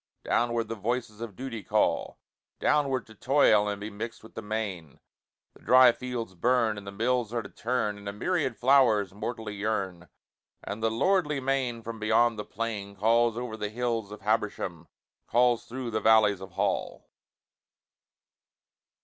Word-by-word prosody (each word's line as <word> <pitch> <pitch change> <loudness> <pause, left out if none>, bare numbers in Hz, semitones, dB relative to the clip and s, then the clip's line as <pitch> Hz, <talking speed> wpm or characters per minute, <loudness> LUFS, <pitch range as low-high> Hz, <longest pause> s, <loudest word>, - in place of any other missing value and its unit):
Downward 120 -1 0
the 115 - -3
voices 115 0 -3
of 115 -4 -6
Duty 130 -3 -5
call - - 0 0.4
Downward, 135 -4 +1
to 110 - -15
toil 110 -3 +3
and 100 -1 -3
be 105 +1 -6
mixed 110 +3 -7
with 110 - -14
the - - -6
main, 105 -8 -4 0.5
The - - -19
dry 130 0 +7
fields 120 -5 -5
burn, 115 +3 +2
and 100 - -13
the - - -5
mills 115 +2 0
are 115 - -1
to 100 - -10
turn, 110 -4 -2
And 100 0 -6
a - - -3
myriad 135 - -1
flowers 120 -7 +4
mortally 110 +1 -5
yearn, 100 -4 -3 0.6
And 105 +2 -5
the 115 - +2
lordly 150 - +1
main 130 -3 -1
from 115 0 -6
beyond 110 +1 +2
the 105 - -4
plain 105 -3 -4
Calls 115 +3 +2
o'er 120 -2 -4
the 105 -1 -4
hills 115 -2 -2
of 105 0 -9
Habersham, 100 -5 -2 0.4
Calls 120 0 +3
through 125 -1 -5
the 110 0 -1
valleys 110 -3 +4
of 95 -1 -10
Hall. 100 -1 -2
110 Hz, 160 wpm, -28 LUFS, 105-120 Hz, 0.6 s, dry